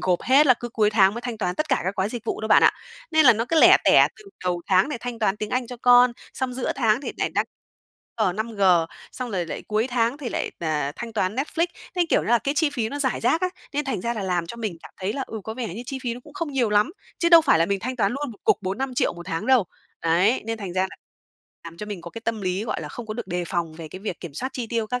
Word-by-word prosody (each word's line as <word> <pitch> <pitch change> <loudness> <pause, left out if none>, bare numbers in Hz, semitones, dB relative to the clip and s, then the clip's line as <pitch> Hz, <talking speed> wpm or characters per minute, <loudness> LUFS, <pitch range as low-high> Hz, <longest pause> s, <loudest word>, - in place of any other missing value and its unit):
gộp 180 -1 +1
hết 280 +4 +5
là 255 - +7
cứ 240 0 -7
cuối 215 -2 +2
tháng 200 -1 +4
mới 235 - -4
thanh 240 -3 -5
toán 180 -4 -1
tất 310 0 -2
cả - - +2
các 190 - -1
gói 190 +2 0
dịch 235 -1 -6
vụ - - -3
đâu 220 - -3
bạn - - +6
ạ. - - +7 0.4
Nên 315 -3 +5
là 255 - +10
nó 225 +2 -1
cứ 325 - +3
lẻ - - +9
tẻ - - +6
từ 425 - -16 0.2
đầu 175 -1 -1
tháng 190 +7 +4
nè 295 - -3
thanh 240 -1 -5
toán 210 -2 +1
tiếng 215 0 -5
Anh 250 -1 0
cho 245 0 -8
con, 245 0 +6 0.2
xong 260 -1 -2
giữa 255 - -1
tháng 225 -1 +2
thì 280 - -5
lại - - -1
đăng - - +2 0.7
G, - - +2
5G, 220 -2 -3 0.5
xong 250 -2 -5
rồi 180 -4 -2
lại - - -6
cuối 215 +3 +1
tháng 240 +2 0
thì 260 -5 -4
lại, - - -2
ờ, 150 -3 -1
thanh 235 -1 -6
toán 205 -1 0
Netflix. 325 +5 0 0.3
Thấy, 355 -2 +2
kiểu - - +3
như - - -5
là, 240 0 +5
cái 280 +3 -2
chi 300 -1 +2
phí 235 -6 -2
nó 285 - -5
rải 265 -3 0
rác 315 +8 +2
á, 370 - +1 0.2
nên 295 0 -1
thành 265 -8 -2
ra 235 +4 -2
là 210 - -3
làm 175 -3 -1
cho 235 - -8
mình 215 -7 -4
cảm - - -11
thấy 190 +3 -1
là, 270 - -3
ừ, 220 - -6
có 220 - -5
vẻ 240 -3 -4
như 235 - -6
chi 270 0 -4
phí 235 -2 -2
nó 245 - -9
cũng - - -15
không 335 -6 -4
nhiều 245 -5 +1
lắm, 210 +8 +3 0.3
chứ 340 - +2
đâu 335 -1 +9
phải 280 - +3
là 165 - +3
mình 200 -1 -1
thanh 255 +1 -4
toán 205 -1 +1
luôn 280 -1 -3
một - - -17
cục 430 -3 +4
4.000.000-5.000.000 245 +7 -1
một 175 0 -10
tháng 165 +7 -3
đâu. 255 -6 +5 0.4
Đấy, 180 +9 +3
nên 225 0 -3
thành 190 -4 -5
ra 185 0 +1
là 190 - -4 0.7
làm 170 0 -9
cho 210 - -7
mình 205 -4 -6
có 170 - -9
cái 230 - -8
tâm 230 -2 -1
lý, 185 +2 -1
gọi - - -3
là, - - -6
không 240 -4 -8
có 215 - -4
được 240 - -5
đề 175 -1 -2
phòng 170 -2 -2
về 160 -1 -8
cái 185 - -9
việc 195 -4 -5
kiểm 165 -6 -8
soát 260 - -3
chi 245 -3 -4
tiêu 225 -1 -1
các 250 +2 -2
225 Hz, 300 wpm, -24 LUFS, 190-255 Hz, 0.7 s, là